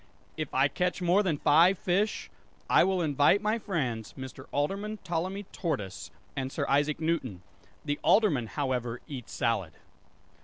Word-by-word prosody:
"If 155 -2 -4
I 135 +2 +5
catch 180 +4 -1
more 180 +3 +3
than 175 -7 0
five 170 +7 +5
fish, 195 +5 -1 0.4
I - - +5
will 190 -2 +1
invite 145 +5 +4
my 215 +2 0
friends 125 - -3
Mr. 130 0 -9
Alderman 200 +9 -1
Ptolemy 185 +4 -2
Tortoise 100 - -4 0.3
and 135 -1 -3
Sir - - -2
Isaac 145 +2 +2
Newton. 145 - -2 0.4
The 145 -1 -1
Alderman, 155 - +3
however, 125 -3 -2
eats 130 -5 -8
salad." 115 - -1
150 Hz, 145 wpm, -29 LUFS, 130-185 Hz, 0.4 s, I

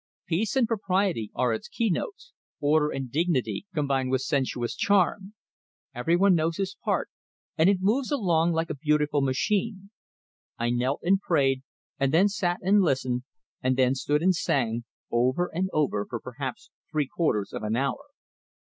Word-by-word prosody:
Peace 195 +7 -1
and 255 -4 +3
propriety 190 - 0
are 125 -2 +1
its 110 - -5
keynotes; 230 - -2 0.3
order 150 +1 +3
and 135 -4 -5
dignity, 165 +4 0
combined 140 -5 0
with 130 0 +1
sensuous 130 -4 -1
charm. 200 +1 +1 0.6
Everyone 175 +10 +3
knows 165 0 +1
his 195 -1 -2
part, - - -1 0.4
and 165 +3 +4
it 195 -2 +2
moves 235 +7 +1
along 175 - +2
like 165 +1 -1
a - - -3
beautiful 150 0 +1
machine. 195 - -1 0.7
I 120 +1 0
knelt 125 +3 0
and 195 +2 +3
prayed, 135 -8 +2 0.4
and 135 -1 +2
then 180 +6 +4
sat 180 -3 -1
and 200 +3 +4
listened, 130 -6 0 0.4
and 130 0 +1
then 130 0 +4
stood 145 +3 0
and 185 +1 +4
sang 120 -8 0 0.3
over 130 +9 +1
and 185 +3 -1
over 130 -9 0
for 120 - -4
perhaps 130 +1 -7 0.2
three 155 -2 +1
quarters 130 - -1
of - - -4
an 110 +1 -1
hour. 140 - -1
155 Hz, 160 wpm, -27 LUFS, 130-190 Hz, 0.7 s, and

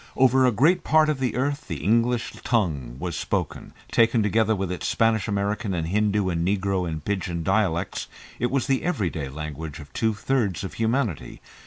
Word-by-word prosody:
Over 130 0 +5
a - - +4
great 155 - +3
part 155 -1 +4
of 150 -3 0
the 130 -2 -1
earth 140 +3 -1
the 80 -7 -5
English 115 +3 +1
tongue 75 - 0
was 85 +3 -4
spoken; - - -3 0.2
taken 115 -1 +3
together 110 +1 +2
with 95 -2 -3
its 90 - -3
Spanish 115 -2 +2
American 100 0 -1
and 80 -1 -2
Hindoo 105 0 +1
and 85 -2 -1
Negro 95 -1 0
and 80 -2 -5
"Pidgin" 90 -4 -2
dialects, 95 -2 0 0.3
it 120 - +1
was 135 -2 0
the 135 -1 +1
everyday 90 - -2
language 75 +1 -6
of 70 -2 -12
two 110 -1 0
thirds 115 -5 0
of 95 - -5
humanity. 115 - -1
105 Hz, 180 wpm, -25 LUFS, 85-120 Hz, 0.3 s, Over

